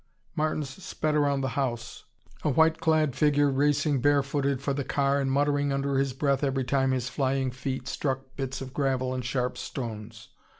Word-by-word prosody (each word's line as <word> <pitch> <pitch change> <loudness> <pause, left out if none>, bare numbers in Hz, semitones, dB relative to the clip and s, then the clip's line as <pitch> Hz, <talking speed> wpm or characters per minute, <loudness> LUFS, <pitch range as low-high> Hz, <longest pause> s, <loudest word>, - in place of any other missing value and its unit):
Martins 155 +1 -2
sped 155 -1 -1
around 145 -2 +2
the 135 - -1
house, 120 -2 -3 0.4
a - - +1
white 160 +3 +3
clad 155 -4 +2
figure 145 0 +3
racing 145 0 +2
bare 145 0 +4
footed 140 -1 -1
for 140 +1 -1
the 140 0 -2
car 140 +1 +1
and 135 -1 0
muttering 145 0 +2
under 140 0 0
his 135 -1 +1
breath 140 +2 0
every 135 -1 +1
time 135 +1 +1
his 130 -2 0
flying 130 0 0
feet 130 +1 -4
struck 135 -1 -3
bits 135 0 -4
of 130 -1 -7
gravel 130 -2 0
and 130 -1 -3
sharp 125 0 -1
stones. 110 -3 -6
135 Hz, 180 wpm, -27 LUFS, 130-145 Hz, 0.4 s, bare